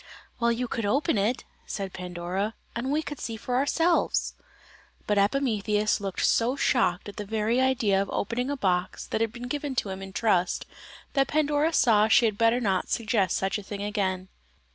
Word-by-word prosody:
"Well, 235 0 +3
you 245 +2 -1
could 230 -1 -3
open 275 - +1
it," 220 +5 0 0.2
said 195 -2 -4
Pandora, 180 +4 -3 0.2
"and 240 +3 -2
we 310 +2 +1
could 295 -3 -7
see 225 -1 -4
for 245 +3 -3
ourselves!" 325 +6 +1 0.7
But 210 -1 +2
Epimetheus 210 -2 +1
looked 195 -2 -1
so 240 +3 +2
shocked 210 -10 +1
at 205 - -9
the 210 - -3
very 220 +4 0
idea 230 -7 +2
of 195 - -3
opening 245 +5 -2
a 285 - -2
box 180 -5 -1
that - - -2
had 225 -1 +1
been 240 +1 -7
given 290 0 -3
to 210 - -1
him 190 0 -5
in 195 0 -8
trust, 185 -4 +1 0.5
that 275 -1 +2
Pandora 300 +1 +1
saw 220 -8 +4
she 235 +2 +5
had 215 -2 +1
better 230 +3 +3
not 195 -6 0
suggest 215 -5 +1
such 195 +2 -1
a - - -9
thing 200 0 -6
again. 190 -3 -2
220 Hz, 185 wpm, -27 LUFS, 195-250 Hz, 0.7 s, she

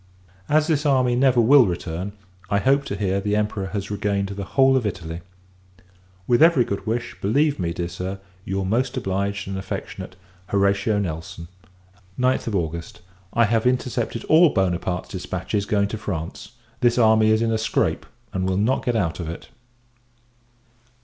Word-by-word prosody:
As 155 +1 +4
this 155 -3 +1
army 130 -4 +3
never 130 -1 +3
will 125 +1 +6
return, 90 +2 -4 0.4
I 100 - +2
hope 140 +5 +2
to - - -4
hear 100 -1 -1
the 105 +1 0
Emperor 105 -2 -1
has 100 +1 -4
regained 100 -1 -1
the 100 0 -5
whole 135 0 +6
of 130 - +2
Italy. 85 -3 -5 1.0
With 120 +6 +2
every 160 -7 +6
good 100 +2 -4
wish, 120 +2 -2
believe 140 +8 +2
me, 85 -2 -1
dear 85 0 -3
Sir, 90 +3 -5 0.2
your 95 0 -2
most 120 +6 0
obliged 100 +1 -2
and 95 0 -3
affectionate 95 - -6 0.3
HORATIO 100 +1 +1
NELSON. 85 -2 -5 0.7
9th 125 -4 +1
August. 85 -2 -4 0.3
I 115 - +4
have 115 +2 +1
intercepted 125 -2 -1
all 160 +1 +6
Buonaparte's 90 - -1
dispatches 100 -1 -3
going 100 -1 +2
to 110 - -5
France. 95 +1 -5 0.3
This 120 0 +2
army 110 -2 +5
is 110 +1 +3
in 115 - +1
a 110 - 0
scrape, 110 -1 0 0.3
and 95 0 -1
will 95 - 0
not 110 +7 +1
get 120 - 0
out 90 -7 -1
of 85 -3 -4
it. 85 - -8
105 Hz, 165 wpm, -23 LUFS, 95-120 Hz, 1.0 s, will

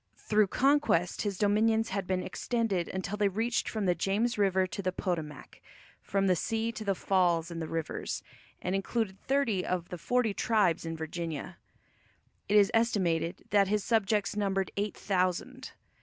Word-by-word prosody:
Through 215 -1 +2
conquest 270 - +2
his 200 -3 -2
dominions 220 +2 +2
had 195 -1 -3
been 185 -1 0
extended 225 -8 -1
until 190 +2 -3
they 205 -1 +3
reached 225 +5 -1
from 215 -3 -2
the 180 - +3
James 210 +6 0
River 190 -2 +2
to 185 - -5
the 185 -1 -1
Potomac, 165 -6 -4 0.4
from 195 0 0
the 185 -2 +4
sea 225 +5 -1
to 215 -1 -7
the 200 -2 0
falls 175 -3 +1
in 165 - -5
the 160 - -3
rivers, 165 -1 -3 0.4
and 180 - -1
included 195 0 -1
thirty 255 -9 +1
of 180 -2 -2
the 180 - -6
forty 245 +2 +1
tribes 195 -7 +1
in 165 0 -4
Virginia. 160 -1 -5 0.9
It 210 - +5
is 200 -1 +5
estimated 185 -7 +1
that 200 -1 +4
his 210 0 0
subjects 210 -2 +1
numbered 195 -2 0
eight 205 +1 -2
thousand. 195 +7 -1
195 Hz, 165 wpm, -30 LUFS, 180-220 Hz, 0.9 s, It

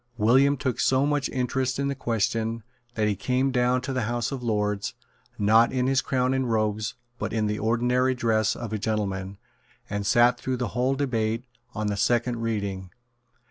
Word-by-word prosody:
William 130 +6 +4
took 130 -2 -2
so 130 +1 +3
much 145 -2 0
interest 130 0 -1
in 140 0 0
the 140 - 0
question 115 -2 -1 0.3
that 110 -1 +1
he 105 - +1
came 130 +6 0
down 125 0 +2
to 135 +1 -4
the 130 - 0
House 120 +1 -1
of 135 -2 -4
Lords, 105 -3 -1 0.4
not 110 +3 +4
in 125 -1 0
his 135 0 +2
crown 130 0 0
and 130 -3 0
robes, 110 0 0 0.2
but - - -3
in 110 -1 0
the 105 0 -1
ordinary 125 +3 +1
dress 110 -3 +1
of 115 -3 -6
a 110 - -1
gentleman, 100 -3 -2 0.5
and 100 0 -2
sate 120 +4 +4
through 130 +2 -2
the 125 -1 -2
whole 130 +2 0
debate 115 -4 -1 0.3
on 105 0 -2
the 105 -1 -1
second 120 +2 +1
reading. 100 -5 -3
120 Hz, 180 wpm, -26 LUFS, 110-130 Hz, 0.5 s, William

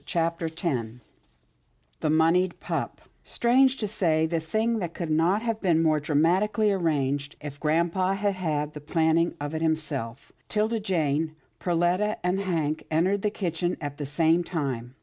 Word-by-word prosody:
CHAPTER 165 0 -1
X 160 +4 -9 1.4
THE 155 - 0
MONEYED 165 +4 +3
PUP - - -4 0.2
Strange 260 +2 +3
to 215 - -2
say, 165 -6 +1
the 165 0 0
thing 220 +8 0 0.2
could 170 -3 -3
not 175 +8 +2
have 230 -2 -2
been 170 -4 +3
more 155 -1 +3
dramatically 185 +9 +2
arranged 145 -6 0
if 145 -1 -8
grampa 170 +5 +1
had 200 0 0
had 155 -5 -2
the 150 - -8
planning 160 +2 +1
of 145 +1 -4
it 160 - -2
himself. 145 -6 -2 0.2
'Tilda 220 +1 0
Jane, 160 -5 0 0.2
Perletta 180 +4 +1
and 180 +2 +1
Hank 160 -5 -1
entered 185 +6 +1
the 210 - +1
kitchen 175 -3 -2
at 145 -2 -5
the 145 - -4
same 165 +4 +2
time. 135 -8 -4
165 Hz, 150 wpm, -26 LUFS, 155-190 Hz, 1.4 s, MONEYED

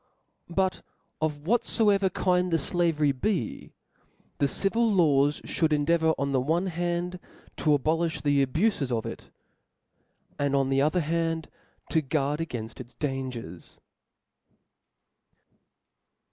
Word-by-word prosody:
p? 170 - -11
U 190 - +5
T 185 - -8 0.4
of 150 -2 -2
whatfoever 210 -2 +3
kind 180 0 +1
the 165 - +3
flavery 160 -2 +1
be» 135 - -2 0.7
the 140 - +3
•* - - -5
^ - - -5
civil 225 +3 +2
laws 145 -6 +3
(hould 160 -2 0
endeavour 160 +2 +2
on 140 0 -1
the 130 -2 +2
one 165 +7 +1
hand 175 0 -2 0.4
to 150 -2 +3
abolifh 160 +4 -1
the 145 -1 +3
abufes 150 - 0
of 115 -2 -1
it, - - -7 1.1
and 140 -1 +1
on 135 -1 +2
the 135 0 +2
other 155 +5 +2 0.9
to 160 - +3
guard 145 +1 -1
againft 120 -9 -5
its 120 -1 -10
dangers. 130 - -5
155 Hz, 130 wpm, -27 LUFS, 140-175 Hz, 1.1 s, U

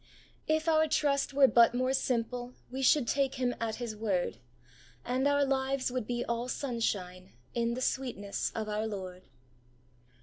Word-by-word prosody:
If 315 +1 +1
our 315 -1 +4
trust 285 -3 +1
were 275 -1 +6
but 235 -1 +5
more 255 +1 +1
simple, 245 -1 -1 0.2
We 265 +1 -4
should 270 -1 +4
take 275 +1 +1
Him 250 -2 0
at 225 -1 -1
His 235 -3 -5
word, 200 - -1 0.7
And 255 +3 +1
our 285 0 +3
lives 265 -1 0
would 250 -4 -3
be 240 0 -2
all 235 +1 -2
sunshine 200 -9 -3 0.2
In 235 0 0
the 255 - -4
sweetness 240 -7 -2
of 220 -1 -3
our 215 +1 -1
Lord. 185 -3 -7
245 Hz, 160 wpm, -31 LUFS, 220-270 Hz, 0.7 s, were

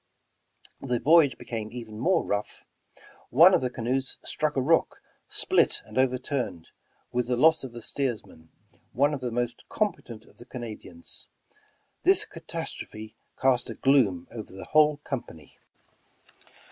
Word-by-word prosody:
The 125 -3 -1
voyage 155 -3 +5
became 110 -2 -5
even 115 -3 -8
more 185 +9 +2
rough. 105 +1 -3 0.7
One 170 +9 +7
of - - +4
the 125 - 0
canoes 125 +2 -2
struck 155 -1 -1
a - - +2
rock, 165 +5 +2 0.3
split - - +2
and - - -13
overturned, 125 - -1 0.4
with 125 -1 0
the 125 -1 0
loss 160 +4 +5
of 130 - -6
the 120 0 -9
steersman, 110 - -3 0.4
one 145 +4 +3
of 140 - -4
the 125 - -2
most 120 0 -3
competent 120 - -3
of - - -22
the 120 - -11
Canadians. 110 -9 -7 0.7
This - - +4
catastrophe 110 0 -7 0.2
cast 130 -2 +2
a - - -5
gloom 115 -11 +3
over 110 -2 -8
the 95 - -9
whole 150 -1 +4
company. 80 - -7
125 Hz, 140 wpm, -27 LUFS, 110-140 Hz, 0.7 s, One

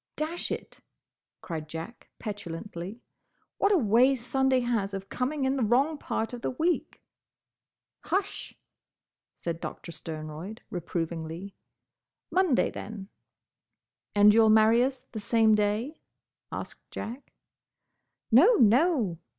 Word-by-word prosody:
"Dash 320 +3 -2
it!" - - -6 0.6
cried 155 -3 -6
Jack, 165 +9 -8
petulantly. 205 0 -6 0.6
"What 400 - +3
a 400 - +5
way 250 +1 +4
Sunday 260 +1 +1
has 220 -5 -1
of 195 0 -7
coming 265 +2 -1
in 265 +1 +1
the 255 - +1
wrong 275 +8 +2
part 225 -3 -2
of 240 - -6
the - - -1
week!" 330 +7 -1 1.0
"Hush!" 390 0 -2 0.8
said 165 -1 -4
Doctor 170 - -7
Sternroyd, 160 +6 -7
reprovingly, 170 +1 -4 0.8
"Monday, 360 -8 +3
then." 205 -2 -8 1.1
"And 205 0 +7
you'll 220 0 +6
marry 220 +2 +6
us 260 0 -2
the 220 - -8
same 220 +1 +3
day?" 210 +8 0 0.5
asked - - -6
Jack. 240 +5 -7 1.0
"No, 345 - +7
no!" 235 - +3
225 Hz, 115 wpm, -28 LUFS, 195-265 Hz, 1.1 s, And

